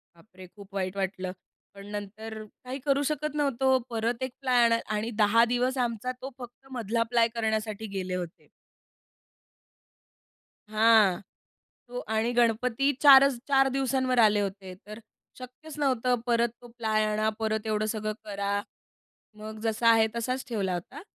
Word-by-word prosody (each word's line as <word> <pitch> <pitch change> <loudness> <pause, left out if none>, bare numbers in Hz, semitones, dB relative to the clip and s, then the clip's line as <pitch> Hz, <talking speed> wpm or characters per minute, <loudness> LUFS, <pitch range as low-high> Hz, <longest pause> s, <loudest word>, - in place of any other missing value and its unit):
बापरे! 185 +1 -15
खूप 200 +1 -16
वाईट 185 0 -2
वाटलं. 190 -1 -3 0.4
पण 200 0 -12
नंतर 215 +2 -7
काही 255 +5 -9
करू 280 0 +2
शकत 305 0 -3
नव्हतो, 265 -2 +2
परत 230 +2 -2
1 260 - -3
प्लॅन 245 -3 +4 0.2
आणि 220 +2 -2
10 225 +3 +5
दिवस 250 +2 0
आमचा 235 +2 -3
तो 265 - -5
फक्त 245 +2 -12
मधला 230 -2 -1
प्लाय 235 -1 +4
करण्यासाठी 220 -1 -2
गेले 185 -1 -3
होते. 175 -2 -7 2.2
हां. 215 -4 +4 0.7
तो 245 +1 -5
आणि 220 +2 +1
गणपती 240 +3 +2
4च, 275 -2 +8
4 270 -1 +4
दिवसांवर 260 -1 0
आले 210 -2 +5
होते 195 -2 -5
तर, 215 +1 -8 0.4
शक्यच 270 +5 -11
नव्हतं 255 -3 +2
परत 235 -1 +2
तो 240 - -12
प्लाय 215 -2 +1
आणा 215 0 +1
परत 220 0 -1
एवढं 215 0 0
सगळं 215 -1 -2
करा, 200 0 -2 0.8
मग 215 0 -8
जसा 225 +1 +2
आहे 225 -1 +5
तसाच 255 +3 -2
ठेवला 195 -5 -1
होता. 175 - -6
225 Hz, 140 wpm, -27 LUFS, 210-250 Hz, 2.2 s, 4च